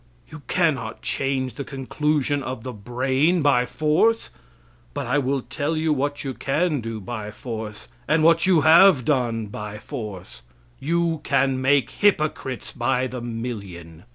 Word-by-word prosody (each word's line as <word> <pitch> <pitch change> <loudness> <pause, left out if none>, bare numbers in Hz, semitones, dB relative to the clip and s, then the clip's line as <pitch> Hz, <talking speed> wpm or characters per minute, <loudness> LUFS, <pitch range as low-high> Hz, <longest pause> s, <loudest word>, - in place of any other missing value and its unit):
You 160 - -9
cannot 140 -11 0
change 135 -2 -1
the 140 - -5
conclusion 145 +1 -1
of 130 -3 -5
the 130 - -5
brain 130 - +1
by 125 -4 +3
force, 155 - +1 0.6
but - - -3
I 130 +5 +1
will 135 -1 -1
tell 150 +5 -2
you 155 0 +1
what 145 +1 -2
you 135 -2 -3
can 150 +2 0
do 115 -1 -5
by 105 0 -6
force, 110 -1 -7 0.2
and 155 +1 +3
what 165 +2 +4
you 175 -4 +5
have 160 -3 +6
done 120 -6 0
by 105 0 -7
force. 100 - -8 0.4
You 165 +1 0
can 130 -1 +1
make 135 -1 +2
hypocrites 155 - 0
by 125 +1 0
the 125 -1 -5
million. 100 -8 -7
130 Hz, 150 wpm, -23 LUFS, 120-150 Hz, 0.6 s, have